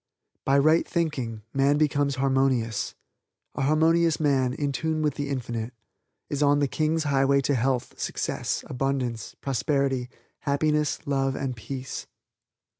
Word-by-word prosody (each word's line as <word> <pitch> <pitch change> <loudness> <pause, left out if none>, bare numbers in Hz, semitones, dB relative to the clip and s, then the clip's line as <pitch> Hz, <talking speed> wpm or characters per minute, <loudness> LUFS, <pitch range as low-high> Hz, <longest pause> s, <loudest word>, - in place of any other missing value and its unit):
By 135 +1 +4
right 155 +4 +4
thinking 130 - -2
man 140 +2 +3
becomes 145 -2 +2
harmonious. 130 -4 +1 0.6
A - - -4
harmonious 160 +3 +3
man 135 -4 +2
in 145 -1 -1
tune 160 +2 -1
with 150 -2 +1
the 145 0 -4
Infinite 120 -3 -3 0.5
is 145 - -3
on 145 0 +4
the 145 -1 +2
King's 155 +3 0
highway 140 -1 +3
to 140 - +1
health, 130 0 -1
success, - - -2
abundance, 125 -4 -2
prosperity, 135 -1 0 0.3
happiness, 150 +1 0
love 135 -1 0
and 135 -2 -3
peace. 130 +3 -6
140 Hz, 130 wpm, -26 LUFS, 130-150 Hz, 0.6 s, By